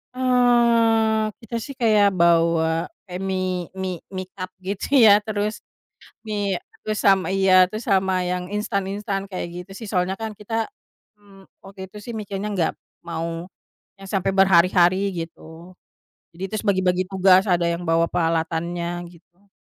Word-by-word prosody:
Eee, 235 -3 +3 0.2
kita 230 +1 -6
sih 275 +4 -8
kayak 210 -5 +3
bawa 165 -1 +2 0.2
kayak 180 0 -6
mie 185 -2 -2
mie 185 -2 -4 0.2
mie 185 0 -4
cup 185 -1 -6
gitu 195 +1 -4 0.2
ya 205 -2 +8
terus, 210 0 -2 0.7
mie 205 -3 -1 0.3
terus 215 0 -2
sama 195 -3 +4
iya, 190 -1 +5
terus 215 +3 -6
sama 190 -1 +2
yang 180 0 -3
instan-instan 200 -1 -2
kayak 185 -3 -4 0.2
gitu 195 - -16
sih 225 - -8
soalnya 185 -1 0
kan 220 0 -3
kita, 225 +2 -2 0.5
mmm, 200 -2 -19 0.2
waktu 195 -1 -9
itu 210 - -12
sih 235 +3 -7
mikirnya 205 -1 -4
gak 165 - +1 0.3
mau 165 0 -4 0.5
yang 195 0 -10
sampai 195 -1 0
berhari-hari 185 -1 +4 0.2
gitu, 165 +1 -10 0.6
jadi 175 +3 -9
terus 215 0 -4
bagi-bagi 185 -2 +2
tugas 190 0 +5
ada 175 -2 +2
yang 170 +1 -3
bawa 165 0 +3
peralatannya 170 +1 -1
gitu. 175 +3 -24
190 Hz, 145 wpm, -22 LUFS, 175-210 Hz, 0.7 s, ya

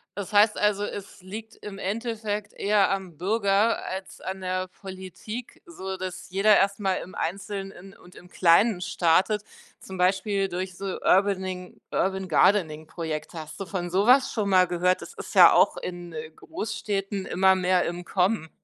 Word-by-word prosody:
das 205 0 -6
heißt 210 +1 +5
also, 210 -1 +1
es 200 -2 -7
liegt 215 +4 -9
im 200 -1 -9
Endeffekt 210 0 -3
eher 205 -1 +2
am 190 -5 -4
Bürger 200 +4 +1
als 190 0 -6
an 190 0 -5
der 185 0 -2
Politik, 190 +5 -9
so 190 - -6
dass 185 0 -6
jeder 200 +2 +5
erst 200 +1 +1
mal 190 -2 +1
im 185 - -12
Einzelnen 195 +1 -5
und 180 - -18
im 180 - -14
Kleinen 180 +3 +4
startet, 185 +5 +2 0.4
zum 190 - -9
Beispiel 195 +2 +1
durch 185 +1 -4
so 195 - -7 0.2
Urbaning 185 -2 0
Urban-Gardening-Projekte. 165 -4 0
Hast 155 0 -9
du 195 - -4
von 175 0 -4
so 195 +4 +2
was 255 +1 +5
schon 210 -3 -1
mal 185 -1 +5
gehört? 180 +1 +1
Das - - -11
ist - - -9
ja - - +9
auch - - +4
in, 175 -1 -7
äh, 155 0 -7
Großstädten 200 - -4
immer 190 +1 +4
mehr 185 -1 +2
im 175 +1 -4
Kommen. 180 -1 0
190 Hz, 160 wpm, -26 LUFS, 180-205 Hz, 0.4 s, ja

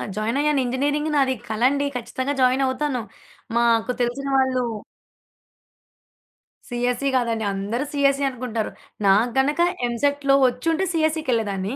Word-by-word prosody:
Join 220 +5 -1
అయ్యాను. 295 -2 +2
Engineering 285 +5 0
నాది 270 -2 +3 0.2
కలండి. 260 +6 +1
ఖచ్చితంగా 260 +4 -3
జాయిన్ 255 +1 +3
అవుతాను. 260 -1 -1 0.6
మాకు 235 0 +2
తెలిసిన 245 +3 -2
వాళ్లు 260 -1 +2 2.1
సీఎస్‌సీ 245 +2 -1
కాదండి. 230 -3 -1
అందరూ 205 +7 -2
సీఎస్‌సీ 280 -1 +2
అనుకుంటారు. 235 -4 -4 0.4
నాకు 215 +5 +4
గనక 290 +5 +1 0.3
ఎంసెట్‌లో 275 +3 +1
వచ్చుంటే 320 +9 0
సీఎస్‌సీకేళ్లేదాన్ని. 250 - 0
255 Hz, 105 wpm, -23 LUFS, 235-285 Hz, 2.1 s, నాకు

